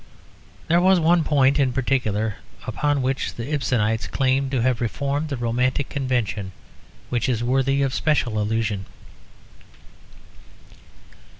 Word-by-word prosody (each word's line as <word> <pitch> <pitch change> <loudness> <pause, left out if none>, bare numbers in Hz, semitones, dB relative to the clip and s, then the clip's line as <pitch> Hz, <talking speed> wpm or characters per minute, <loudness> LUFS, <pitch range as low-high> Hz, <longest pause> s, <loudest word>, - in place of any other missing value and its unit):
There 170 +2 +4
was 185 0 +5
one 170 +1 +3
point 140 -2 +3
in 130 -3 +2
particular 110 -5 0 0.3
upon 145 -2 0
which 135 +1 -2
the 120 +6 -5
Ibsenites 115 -6 0
claimed 135 0 +1
to 130 -3 0
have 125 -2 +1
reformed 140 +6 -2
the 140 - -3
romantic 125 +3 0
convention 120 -8 -2 0.6
which 120 +1 0
is 120 -2 0
worthy 135 +2 +1
of 135 -2 -1
special 125 -9 0
allusion. 105 -2 -1
130 Hz, 120 wpm, -23 LUFS, 115-140 Hz, 0.6 s, was